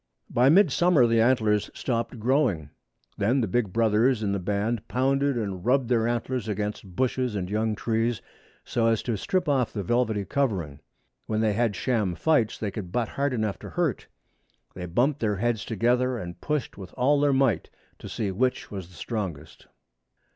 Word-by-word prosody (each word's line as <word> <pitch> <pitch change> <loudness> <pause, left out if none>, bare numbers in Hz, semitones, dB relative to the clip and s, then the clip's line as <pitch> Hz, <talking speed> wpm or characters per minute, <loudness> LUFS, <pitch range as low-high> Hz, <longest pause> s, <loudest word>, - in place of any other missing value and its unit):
By 125 +3 +4
mid 180 0 +5
summer 170 -5 +4
the 115 -1 +3
antlers 110 -4 +2
stopped 120 -1 -2
growing. 110 - +1 0.5
Then 120 +7 +2
the 110 - 0
big 105 0 0
brothers 115 +2 +2
in 100 - 0
the 100 - -1
band 105 +4 -2
pounded 135 +1 +1
and 100 -5 -3
rubbed 125 +1 +2
their 115 -2 +2
antlers 120 0 -2
against 105 -2 -4
bushes 125 0 0
and 95 -3 -2
young 110 0 0
trees, 115 +1 0 0.5
so 115 -1 +1
as 115 -2 +1
to 120 - -1
strip 180 - -1
off 135 -5 +1
the 100 - -4
velvety 110 -1 0
covering. 95 - -1 0.5
When 110 0 0
they 110 -2 +2
had 115 -1 +1
sham 105 -6 0
fights 120 - +1
they 105 -2 -3
could 95 -4 -6
butt 120 +1 -1
hard 140 0 -1
enough 110 -7 -2
to - - -9
hurt. - - -1 0.7
They 90 -1 -6
bumped 130 - +1
their 105 -2 0
heads 115 +1 -1
together, 125 +3 +1
and 85 -5 -7
pushed 150 -8 -3
with 95 -2 -10
all 140 +3 +3
their 145 0 +3
might 130 -10 +1 0.3
to - - -9
see 105 -3 -2
which 125 +7 -1
was 95 -4 -6
the 90 - -18
strongest. 90 - -5
115 Hz, 180 wpm, -26 LUFS, 100-125 Hz, 0.7 s, mid